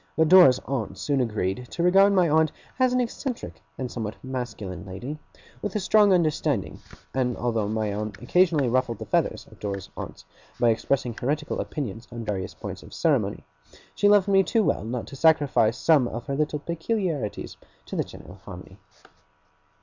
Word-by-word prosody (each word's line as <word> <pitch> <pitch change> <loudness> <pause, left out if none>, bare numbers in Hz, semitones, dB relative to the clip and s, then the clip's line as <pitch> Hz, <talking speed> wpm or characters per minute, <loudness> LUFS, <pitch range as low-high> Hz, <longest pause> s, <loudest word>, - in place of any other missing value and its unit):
But 160 -1 +4
Dora's 175 -9 +8
aunts 110 -8 -3
soon 140 -2 0
agreed 110 0 -2
to 170 - -3
regard 195 +3 +6
my 185 -3 +4
aunt 155 0 +3 0.3
as 255 -1 +4
an 250 - +2
eccentric 250 +1 -4 0.2
and 130 -2 -4
somewhat 110 -3 -4
masculine 120 -8 -5
lady, 120 +11 -7 0.4
with 205 -1 -4
a - - +2
strong 205 +1 +4
understanding; 155 - +1 0.3
and 125 -2 0
although 115 -4 -1
my 110 -1 -1
aunt 105 +1 -4
occasionally 160 +1 +3
ruffled 125 -1 0
the - - -7
feathers - - 0
of - - -17
Dora's 100 -2 -5
aunts, - - -8 0.3
by 120 - +4
expressing 120 +2 -1
heretical 150 +7 -2
opinions 115 -6 -5
on 115 -1 -6
various 95 -3 -3
points - - -7
of - - -12
ceremony, - - +1 0.5
she 205 - +3
loved 205 -1 +5
me 195 -1 +5
too 220 +3 +1
well - - 0
not 115 +2 -4
to - - -10
sacrifice 140 -7 +3
some 145 -2 +4
of 120 0 -6
her 140 - -2
little 150 +1 0
peculiarities 170 - -3 0.3
to - - -7
the - - +1
general - - -13
harmony. - - -11
135 Hz, 175 wpm, -25 LUFS, 115-170 Hz, 0.5 s, Dora's